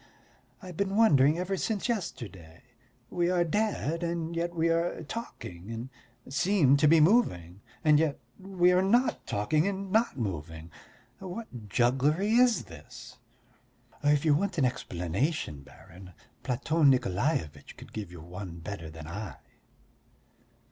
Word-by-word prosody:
I've 180 Hz, -3 st, -9 dB
been 200 Hz, 0 st, -1 dB
wondering 150 Hz, -9 st, +5 dB
ever 185 Hz, +2 st, -2 dB
since 205 Hz, +3 st, -2 dB
yesterday. 95 Hz, -, -5 dB, 0.5 s
We 175 Hz, 0 st, +1 dB
are 180 Hz, -1 st, +2 dB
dead 170 Hz, -3 st, -1 dB
and 170 Hz, -1 st, -3 dB
yet 170 Hz, +1 st, -2 dB
we 165 Hz, 0 st, +1 dB
are 165 Hz, 0 st, 0 dB
talking 105 Hz, -, -8 dB
and 115 Hz, +3 st, -6 dB, 0.4 s
seem 150 Hz, -1 st, +3 dB
to 150 Hz, +2 st, +4 dB
be 165 Hz, +2 st, +6 dB
moving 105 Hz, -, +2 dB, 0.2 s
and 150 Hz, -1 st, +5 dB
yet 155 Hz, -3 st, 0 dB, 0.2 s
we 185 Hz, -2 st, +2 dB
are 180 Hz, 0 st, +4 dB
not 235 Hz, +7 st, +1 dB
talking 150 Hz, -, +1 dB
and 195 Hz, -1 st, -4 dB
not 220 Hz, -, +2 dB
moving. 80 Hz, -, -5 dB, 0.5 s
What 180 Hz, -, -8 dB
jugglery 135 Hz, -, +2 dB
is 240 Hz, -, +4 dB
this?" 80 Hz, -7 st, -13 dB, 0.8 s
"If 145 Hz, +1 st, +3 dB
you 155 Hz, -, +5 dB
want 185 Hz, +4 st, 0 dB
an 140 Hz, -, +3 dB
explanation, 90 Hz, -, -2 dB
baron, 90 Hz, +6 st, -15 dB, 0.3 s
Platon 145 Hz, +4 st, +2 dB
Nikolaevitch 100 Hz, -, -1 dB
could -, -, -13 dB
give 100 Hz, -5 st, -6 dB
you 85 Hz, -3 st, -10 dB
one 90 Hz, +1 st, -8 dB
better 85 Hz, -2 st, -7 dB
than 80 Hz, -1 st, -10 dB
I." 95 Hz, +3 st, -6 dB
150 Hz, 135 wpm, -29 LUFS, -, 0.8 s, be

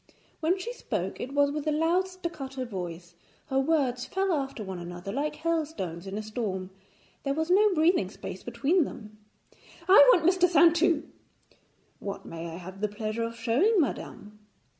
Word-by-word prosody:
When 335 Hz, +4 st, +1 dB
she 465 Hz, +6 st, -5 dB
spoke, -, -, -4 dB
it 260 Hz, -, -5 dB
was 285 Hz, 0 st, +4 dB
with 300 Hz, +1 st, -4 dB
a -, -, +3 dB
loud 330 Hz, +5 st, +2 dB
staccato 300 Hz, -8 st, -6 dB
voice; 175 Hz, -5 st, -6 dB, 0.4 s
her 265 Hz, -1 st, +2 dB
words 270 Hz, -4 st, +1 dB
fell 385 Hz, -1 st, 0 dB
after 270 Hz, -6 st, -3 dB
one 190 Hz, -2 st, -6 dB
another 175 Hz, +2 st, -7 dB
like 290 Hz, +6 st, -2 dB
hailstones 300 Hz, -, -3 dB
in 195 Hz, +1 st, -4 dB
a 215 Hz, -, -4 dB
storm, 200 Hz, -4 st, -4 dB, 0.5 s
there 275 Hz, 0 st, -1 dB
was 320 Hz, +3 st, -1 dB
no 415 Hz, +3 st, +5 dB
breathing 315 Hz, -, +3 dB
space 190 Hz, -2 st, -8 dB
between 275 Hz, +10 st, +1 dB
them. 215 Hz, -5 st, -9 dB, 0.7 s
'I 410 Hz, +6 st, +9 dB
want 345 Hz, -8 st, +3 dB
Mr. 365 Hz, 0 st, +4 dB
Saintou.' 335 Hz, 0 st, +4 dB, 1.0 s
'What 200 Hz, -1 st, -6 dB
may 165 Hz, 0 st, -6 dB
I 165 Hz, -, -7 dB
have 185 Hz, +2 st, -10 dB
the 210 Hz, -, +2 dB
pleasure 215 Hz, +2 st, -4 dB
of 230 Hz, 0 st, -3 dB
showing 275 Hz, -, +3 dB
madame?' 210 Hz, -8 st, -3 dB
270 Hz, 165 wpm, -28 LUFS, 205-335 Hz, 1.0 s, I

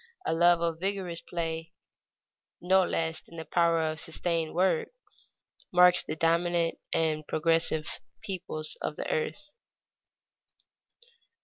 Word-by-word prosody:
A -, -, +1 dB
love 170 Hz, +1 st, +4 dB
of 165 Hz, -1 st, -1 dB
vigorous 190 Hz, -3 st, -2 dB
play 165 Hz, -1 st, -4 dB, 0.9 s
no 190 Hz, +2 st, +4 dB
less 160 Hz, -2 st, -1 dB
than 165 Hz, -, -14 dB
the 160 Hz, -, -6 dB
power 170 Hz, -1 st, +2 dB
of 155 Hz, 0 st, -1 dB
sustained 165 Hz, 0 st, -2 dB
work, 180 Hz, -2 st, +2 dB, 0.8 s
marks 180 Hz, 0 st, +6 dB
the 155 Hz, -, -5 dB
dominant 170 Hz, +1 st, +1 dB
and 155 Hz, -2 st, 0 dB
progressive 165 Hz, -1 st, +1 dB, 0.4 s
peoples 175 Hz, -5 st, -3 dB
of 150 Hz, -, -3 dB
the -, -, -4 dB
earth. 295 Hz, -, -2 dB
165 Hz, 115 wpm, -29 LUFS, 160-175 Hz, 0.9 s, marks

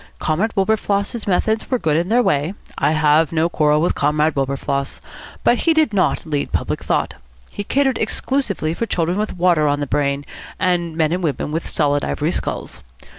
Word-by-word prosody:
Comrade 190 Hz, +9 st, -1 dB
Wilberfloss's 205 Hz, +2 st, 0 dB
methods 220 Hz, +4 st, 0 dB
were 255 Hz, -, +2 dB
good 155 Hz, -9 st, 0 dB
in 170 Hz, +3 st, 0 dB
their 245 Hz, +2 st, +4 dB
way. 150 Hz, +4 st, 0 dB, 0.2 s
I 155 Hz, -, +1 dB
have 155 Hz, 0 st, +3 dB
no 165 Hz, +1 st, +1 dB
quarrel 150 Hz, -2 st, +2 dB
with 175 Hz, -, +2 dB
Comrade 150 Hz, +2 st, +1 dB
Wilberfloss. 140 Hz, 0 st, -2 dB, 0.4 s
But 240 Hz, -, +3 dB
he 330 Hz, -1 st, +2 dB
did 310 Hz, -8 st, +3 dB
not 190 Hz, -2 st, +1 dB
lead 150 Hz, -3 st, -2 dB
public -, -, -2 dB
thought. -, -, 0 dB, 0.4 s
He 205 Hz, -, -5 dB
catered 270 Hz, +3 st, +1 dB
exclusively 215 Hz, -, -1 dB
for 230 Hz, +7 st, -3 dB
children 175 Hz, 0 st, 0 dB
with 215 Hz, -3 st, -3 dB
water 170 Hz, -4 st, +3 dB
on 145 Hz, 0 st, +1 dB
the 145 Hz, -, -1 dB
brain, 140 Hz, 0 st, -1 dB, 0.3 s
and 175 Hz, -3 st, 0 dB
men 155 Hz, -1 st, +2 dB
and 180 Hz, +2 st, -1 dB
women 150 Hz, -2 st, -2 dB
with 160 Hz, +2 st, -3 dB
solid 145 Hz, -2 st, +1 dB
ivory 155 Hz, +3 st, -1 dB
skulls. -, -, -4 dB
165 Hz, 180 wpm, -20 LUFS, 150-205 Hz, 0.4 s, their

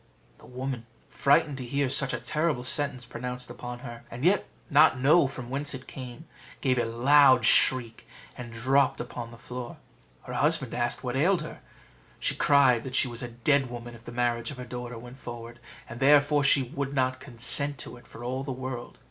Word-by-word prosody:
The -, -, -16 dB
woman, 125 Hz, -2 st, -5 dB, 0.2 s
frightened 145 Hz, 0 st, +2 dB
to -, -, -5 dB
hear 140 Hz, +3 st, -1 dB
such 135 Hz, +1 st, +3 dB
a -, -, -3 dB
terrible 150 Hz, -5 st, -1 dB
sentence 130 Hz, -2 st, +1 dB
pronounced 125 Hz, +1 st, -6 dB
upon 120 Hz, 0 st, -8 dB
her, 120 Hz, 0 st, -8 dB
and 125 Hz, +5 st, -5 dB
yet 195 Hz, +3 st, +3 dB, 0.2 s
not 145 Hz, -2 st, +5 dB
know 145 Hz, +3 st, +4 dB
from 125 Hz, -2 st, -8 dB
whence 140 Hz, +1 st, -2 dB
it 130 Hz, -, -10 dB
came, 130 Hz, +4 st, -9 dB, 0.3 s
gave 130 Hz, -3 st, +1 dB
a 120 Hz, -, +1 dB
loud 130 Hz, +1 st, +5 dB
shriek, 115 Hz, -2 st, +4 dB, 0.3 s
and 120 Hz, -1 st, -8 dB
dropped 130 Hz, +5 st, +1 dB
upon 120 Hz, -1 st, -6 dB
the 115 Hz, -, -13 dB
floor. 125 Hz, +1 st, -8 dB, 0.5 s
Her -, -, -8 dB
husband 150 Hz, -4 st, +1 dB
asked 120 Hz, +2 st, -1 dB
what 125 Hz, -1 st, -3 dB
ailed 170 Hz, +4 st, +2 dB
her: 155 Hz, -, -9 dB, 0.6 s
she -, -, 0 dB
cried 135 Hz, -5 st, +4 dB
that 130 Hz, -1 st, -6 dB
she 135 Hz, -, +3 dB
was 120 Hz, -1 st, -4 dB
a 125 Hz, -, -4 dB
dead 130 Hz, +3 st, +1 dB
woman 120 Hz, 0 st, -8 dB
if 115 Hz, -1 st, -14 dB
the -, -, -8 dB
marriage 120 Hz, -1 st, -1 dB
of 140 Hz, -, -8 dB
her 125 Hz, -, -7 dB
daughter 125 Hz, -1 st, -7 dB
went 120 Hz, +3 st, -12 dB
forward, 120 Hz, -1 st, -9 dB, 0.3 s
and 120 Hz, -, -9 dB
therefore 145 Hz, +1 st, +4 dB
she 135 Hz, 0 st, +4 dB
would 140 Hz, +1 st, -5 dB
not 130 Hz, -1 st, 0 dB
consent 140 Hz, +2 st, +1 dB
to -, -, -9 dB
it 120 Hz, -, -17 dB
for 115 Hz, -, -11 dB
all 130 Hz, +2 st, -3 dB
the 135 Hz, -, -5 dB
world. 130 Hz, -1 st, -6 dB
125 Hz, 200 wpm, -27 LUFS, 120-140 Hz, 0.6 s, not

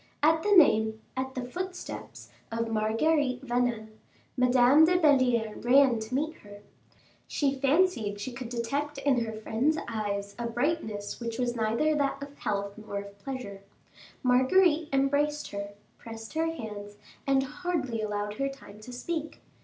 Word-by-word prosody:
At 320 Hz, +1 st, +4 dB
the 415 Hz, -, 0 dB
name 220 Hz, -, +5 dB, 0.2 s
at 260 Hz, 0 st, -3 dB
the 255 Hz, -1 st, -3 dB
footsteps 365 Hz, +8 st, -7 dB, 0.2 s
of 230 Hz, 0 st, -2 dB
Marguerite 255 Hz, +5 st, +1 dB
Vanel, 240 Hz, -3 st, 0 dB, 0.5 s
Madame 250 Hz, +3 st, +5 dB
de 360 Hz, +3 st, +5 dB
Belliere 255 Hz, -9 st, +3 dB
ran 255 Hz, -1 st, +5 dB
to 220 Hz, +3 st, -4 dB
meet 310 Hz, +4 st, -1 dB
her. 205 Hz, 0 st, -13 dB, 0.7 s
She 280 Hz, -2 st, 0 dB
fancied 275 Hz, -, +1 dB
she 230 Hz, +5 st, -4 dB
could 240 Hz, -1 st, -7 dB
detect 275 Hz, +5 st, -2 dB
in 275 Hz, -3 st, +2 dB
her 225 Hz, -, -4 dB
friend's 225 Hz, +8 st, 0 dB
eyes 205 Hz, -3 st, -3 dB
a 235 Hz, -, -1 dB
brightness 230 Hz, -4 st, -2 dB
which 230 Hz, -1 st, -4 dB
was 245 Hz, -1 st, -1 dB
neither 230 Hz, +7 st, +1 dB
that 285 Hz, -2 st, 0 dB
of 280 Hz, 0 st, -10 dB
health 200 Hz, 0 st, -3 dB
nor 215 Hz, -2 st, -6 dB
of 200 Hz, 0 st, -8 dB
pleasure. 200 Hz, -5 st, -6 dB, 0.6 s
Marguerite 300 Hz, +6 st, +4 dB
embraced 285 Hz, +2 st, +1 dB
her, 200 Hz, 0 st, -5 dB, 0.3 s
pressed 225 Hz, -1 st, -9 dB
her 320 Hz, +1 st, +1 dB
hands, 210 Hz, -9 st, -6 dB, 0.3 s
and 270 Hz, -1 st, +3 dB
hardly 295 Hz, -6 st, -3 dB
allowed 210 Hz, -1 st, -2 dB
her 275 Hz, 0 st, +1 dB
time 210 Hz, -6 st, -12 dB
to 215 Hz, +4 st, -10 dB
speak. 315 Hz, +5 st, -4 dB
250 Hz, 150 wpm, -28 LUFS, 220-290 Hz, 0.7 s, name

